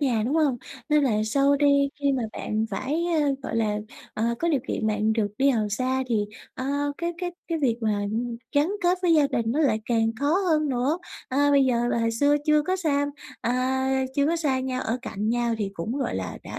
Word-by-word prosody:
nhà, 245 -6 +1
đúng 275 - 0
hông? 295 -6 +2 0.3
Nên 300 -1 +4
là 215 -5 +1
sau 275 +5 +3
đi 280 -1 +4
khi 280 -1 +2
mà 255 - 0
bạn 215 +1 -2
phải, 305 +6 -1
à, 310 -4 +2
gọi 225 - -3
là, 210 -2 +1 0.4
ờ, 230 +2 0
có 340 - 0
điều 285 -5 +2
kiện 220 - -1
bạn 215 0 +1
được 220 -2 +1
đi 275 +1 +4
học 220 -5 +1
xa 255 +4 0
thì, 220 -3 +1 0.3
ờ, 255 - -5 0.3
cái 340 0 -2
cái 355 0 -2 0.2
cái 330 - -1
việc 250 -6 +1
mà 215 -2 0 0.5
gắn 290 +3 +3
kết 360 +1 +3
với 345 -2 +4
gia 300 -2 +5
đình 230 -4 -1
nó 285 - -1
lại 230 -8 +2
càng 225 -1 +1
khó 285 - +1 0.2
hơn 305 -1 +2
nữa. 270 +6 0 0.3
À, 285 +2 +2
bây 280 -1 +5
giờ 240 -2 +1
là 235 - 0
hồi 230 0 +1
xưa 285 +6 +3
chưa 300 -1 +4
có 370 +4 0
xam 285 -5 0 0.3
à, 265 +2 0
chưa 280 0 +2
có 335 +2 +1
xa 285 -5 0
nhau, 255 -1 -2
ở 235 +3 -1
cạnh 210 -3 -3
nhau 235 0 +1
thì 200 -2 -2
cũng, 205 +10 -3
gọi 265 - -2
là, 95 -1 -4
đã - - -7
265 Hz, 230 wpm, -25 LUFS, 230-290 Hz, 0.5 s, gia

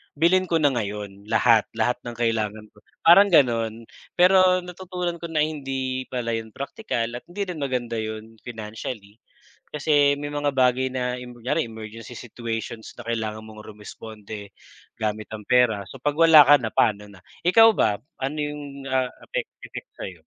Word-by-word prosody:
bilhin 175 +5 +3
ko 165 - +3
na 145 -2 +4
ngayon. 105 -3 -5
Lahat, 115 -1 +4
lahat 125 - +1
ng 120 -1 -6
kailangan 110 -2 -1
ko, - - -29 0.3
parang 195 +5 +8
ganon. 115 -7 +3 0.3
Pero 185 0 +5
natutunan 180 -1 -5
ko 170 - -4
na 155 -2 +1
hindi 135 -4 -3
pala 120 -2 -2
'yun 110 -1 -7
praktikal 135 - -3
at 120 - -7
hindi 180 +4 -6
rin 175 -4 -5
maganda 125 -4 -2
'yun 110 +1 -6
financially. 110 -2 -7 0.5
Kasi 145 -1 +2
may 145 - -4
mga 145 -1 0
bagay 130 0 +3
na 125 -1 -2
'yun, 125 0 -9
kunyari 120 +2 -1
emergency 110 +1 -9
situations 115 -1 -6
na - - -11
kailangan 110 -2 -2
mong 110 -1 -12
rumesponde 105 -1 -10 0.5
gamit 110 -1 -2
ang 105 -1 -7
pera. 120 -5 +3
So - - -10
'pag 145 +1 -1
wala 165 -3 +9
ka 145 0 +7
na, 115 - -2
pa'no 105 -3 +2
na? 95 -3 -16 0.2
Ikaw 225 +5 +8
ba, 105 - +2 0.2
ano 135 +3 -2
'yung, 145 -2 -5
ah, 130 -1 +1 0.2
effect - - -4 0.2
effect - - -9
sa'yo? - - -8
125 Hz, 165 wpm, -24 LUFS, 110-145 Hz, 0.5 s, wala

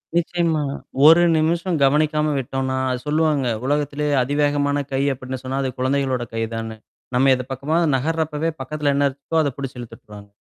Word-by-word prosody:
நிச்சயமா. 170 -2 +1 0.4
ஒரு 165 +3 +8
நிமிஷம் 170 +2 0
கவனிக்காம 150 +2 +2
விட்டோம்னா, 130 0 -2
அ - - 0
சொல்லுவாங்க. 150 -3 +1 0.2
உலகத்திலேயே 145 +1 0
அதிவேகமான 145 +1 0
கை 135 - +1
அப்படின்னு 130 0 -7
சொன்னா, 130 +1 -3
அது 130 - -2
குழந்தைகளோட 130 -1 0
கை 115 - 0
தானு. 115 -1 -5 0.4
நம்ம 135 +2 +4
எது 125 - -4
பக்கமா 140 +5 -1 0.2
நகர்றப்பவே 160 +2 -1
பக்கத்துல 145 +1 -1
என்ன 140 0 +3
இருக்கோ 140 +4 -8
அத 145 - +1
புடுச்சு 135 -2 -6
இழுத்துட்டுருவாங் 105 -3 -11
145 Hz, 150 wpm, -21 LUFS, 130-155 Hz, 0.4 s, ஒரு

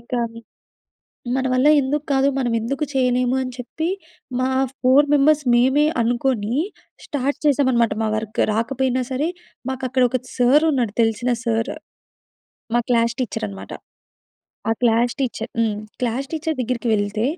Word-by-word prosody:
ఇంకా 240 +1 -4 1.2
మన 265 0 0
వల్ల 255 +3 +3
ఎందుకు 285 +2 -1
కాదు, 270 0 +3
మనం 245 -3 0
ఎందుకు 265 +6 -2
చేయలేము, 250 -1 +2
అని 255 -1 -4
చెప్పి 310 +6 -4 0.5
మా 255 +1 +1 0.3
4 265 +3 +5
మెంబర్స్ 295 +1 +4
మేమే 265 +5 +4 0.2
అనుకోని, 235 -2 0 0.5
స్టార్ట్ 285 0 -2
చేసాం 285 -2 +3
అనమాట. 235 -2 +2
మా - - +1
వర్క్ 215 0 -4
రాకపోయినా 255 +3 0
సరే, 270 +5 0 0.4
మాకు 265 0 -5
అక్కడ 255 0 +2
ఒక 255 - 0 0.2
సార్ 265 +6 +4
ఉన్నాడు. 240 -7 0
తెలిసిన 230 +2 +1
సార్, 225 -1 0 1.0
మా - - +4
క్లాస్ 235 -1 +2
టీచర్ 235 - -3
అనమాట. 95 -1 -9 1.0
ఆ - - +3
క్లాస్ 235 0 +3
టీచర్ 240 -4 -2
హ్మ్. 220 -2 +1 0.2
క్లాస్ 250 +3 -1
టీచర్ 320 0 -2
దగ్గరికి 245 0 -2
వెళ్తే, 205 +1 0
250 Hz, 140 wpm, -21 LUFS, 230-270 Hz, 1.2 s, 4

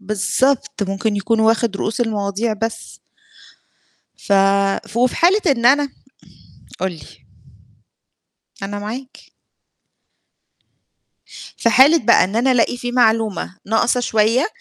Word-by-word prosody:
بالضبط، 215 +4 -1
ممكن 200 +2 -2
يكون 225 +2 0
واخِد 220 -2 +1
رؤوس 220 +5 -3
المواضيع 215 0 -2
بس. 225 +2 -6 1.2
ف - - -4 0.6
ف 220 - -11
وفي 250 +1 +1
حالة 375 +5 +3
إن 240 -5 +2
أنا 285 +2 +3 0.9
قُل 190 -1 -1
لي. 155 -6 -13 1.6
أنا 205 +1 -5
معاك. 245 +6 -9 2.3
في 230 - +1
حالة 280 +8 +5
بقى 210 - +4
إن 195 +4 -5
أنا 255 +3 +2
ألاقي 245 0 +1
في 245 0 -5
معلومة 220 -5 0
ناقصة 230 +3 +1
شوية 230 +5 +1
225 Hz, 110 wpm, -18 LUFS, 210-250 Hz, 2.3 s, حالة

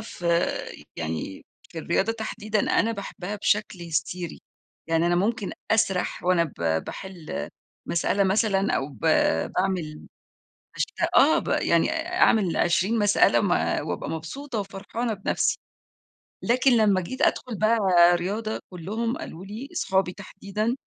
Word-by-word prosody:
في 175 - -7 0.7
يعني 80 +3 -4 0.2
في 165 - -8
الرياضة 190 +7 0
تحديدًا 215 -1 -2 0.2
أنا 230 - 0
باحبّها 200 -1 -6
بشكل 205 -3 0
هستيري، 170 +1 -3 0.5
يعني 165 +1 +2
أنا 175 - +2
ممكن 205 +2 0 0.2
أسرح 210 -5 +1
وأنا 180 -2 +3
ب 80 - -2
باحل 185 -5 -6 0.4
مسألة 185 +3 +1
مثلًا 195 0 +2
أو 135 - -2
ب 135 -7 -15 0.5
باعمل 180 -5 -2 0.7
بشت - - -1 0.2
آه - - +6
ب - - -8
يعني - - +2
أعمل 195 -7 +2
20 190 +6 +2
مسألة 205 -1 +4
م - - 0 0.4
وأبقى - - -3
مبسوطة 230 - -5
وفرحانة 205 +4 -4
بنَفسي. 195 -1 0 0.9
لكن 255 +3 +3
لمّا 205 -4 +3
جيت 255 +9 -6
أدخل 245 -4 +1
بقى 220 +3 +3 0.4
رياضة، 210 +5 -3
كلّهم 220 +7 -3
قالوا 180 +4 -8
لي- 225 +8 -7
أصحابي 190 - 0
تحديدًا- 205 +3 -3
195 Hz, 125 wpm, -25 LUFS, 175-220 Hz, 0.9 s, آه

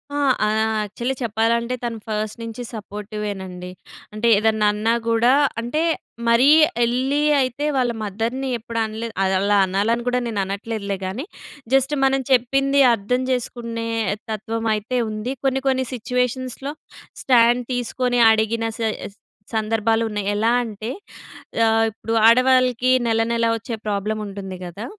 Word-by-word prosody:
ఆ! - - -1 0.3
ఆహ్, 215 +1 +1 0.3
యాక్చల్లీ 235 +6 -3
చెప్పాలంటే, 235 +2 0
తను 235 -1 -3
ఫస్ట్ 215 0 -3
నించి 230 +2 -6
సపోర్టివేనండి. 205 -4 -6 0.4
అంటే, 215 +2 -1
ఏదన్నన్నా 215 +1 +2
గూడా, 230 +2 +4 0.3
అంటే, 245 +7 -1 0.5
మరీ 240 +4 +5 0.3
యెళ్ళీ 260 +5 +1 0.2
అయితే 260 +3 -2
వాళ్ళ 250 -2 +2
మదర్‍ని 230 +6 -3
ఎప్పుడు 230 0 -5
అనలేదు. 220 +1 -6
అదలా 195 +2 +2
అనాలని 205 +5 0
గూడా 250 0 +2
నేననట్లేదులే 200 0 -3
గానీ, 205 - -4 0.5
జస్ట్ 270 +2 +3
మనం 270 0 +2
చెప్పింది 275 +3 +3
అర్థం 230 +4 -1
జేసుకునే 230 -2 -3 0.4
తత్వమయితే 220 +2 -2
ఉంది. 215 +4 -4
కొన్ని, 265 0 +1
కొన్ని 260 -1 +1
సిచ్యువేషన్స్‌లో 250 +3 -2 0.5
స్టాండ్ 240 -1 +4
తీసుకొని 245 0 -1
అడిగిన 220 +1 +1
సేస్ 215 -2 -3 0.4
సందర్భాలున్నాయి. 220 -1 0
ఎలా 220 +3 +2
అంటే, 220 0 -6 0.8
ఆహ్, 225 0 +3
ఇప్పుడూ 225 +1 -5
ఆడవాళ్ళకీ 255 +1 +4 0.2
నెలనెలా 230 +1 +1
ఒచ్చే 230 +1 -5
ప్రాబ్లముంటుంది 200 -2 -3
గదా! 180 +6 -7
230 Hz, 115 wpm, -21 LUFS, 215-250 Hz, 0.8 s, మరీ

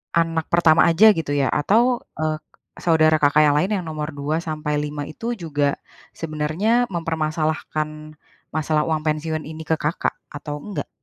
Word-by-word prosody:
anak 165 -1 +1
pertama 165 -2 +5
aja 205 +7 +7
gitu 160 -3 -3
ya? 140 -2 +2
Atau, 235 - +3 0.2
eee, 155 0 0 0.4
saudara 155 -2 +4
Kakak 150 +1 +5
yang 145 - +4
lain 185 +6 +1
yang - - -10
nomor 155 0 -4
2 150 +3 -1
sampai 150 -2 -2
5 150 -1 -4
itu 230 +11 -4
juga 145 -5 -1 0.4
sebenarnya 165 +10 0
mempermasalahkan 155 -1 -2 0.4
masalah 155 0 +1
uang 155 -1 0
pensiun 155 +1 -1
ini 155 +1 -8
ke 160 - +1
Kakak 150 +3 -1 0.2
atau 145 0 -5
enggak? 205 -2 -5
155 Hz, 150 wpm, -22 LUFS, 150-165 Hz, 0.4 s, aja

